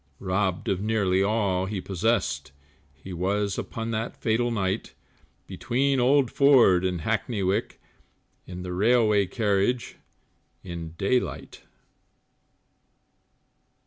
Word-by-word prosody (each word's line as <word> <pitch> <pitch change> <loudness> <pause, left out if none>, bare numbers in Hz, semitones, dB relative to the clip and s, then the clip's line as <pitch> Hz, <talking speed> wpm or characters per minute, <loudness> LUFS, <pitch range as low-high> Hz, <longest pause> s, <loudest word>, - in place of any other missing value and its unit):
Robbed 95 0 -1
of 95 -1 0
nearly 100 -4 +1
all 100 -3 +1
that 95 - -6
he 100 - -2
possessed, 90 -7 -1 0.4
He 70 +7 -11
was, 100 +3 -1
upon 115 0 -5
that 115 +1 -3
fatal 120 +2 0
night, 100 -2 -2 0.5
Between 135 +2 0
Old 130 0 +3
Ford 125 -10 +5
and 90 -2 -1
Hackney 110 +1 -1
Wick, 95 +2 -1 0.7
In 90 0 -7
the 90 -1 -5
Railway 105 0 +3
Carriage 105 +3 0 0.7
in 85 -3 -7
daylight. 120 +7 -2
100 Hz, 110 wpm, -26 LUFS, 90-115 Hz, 0.7 s, Ford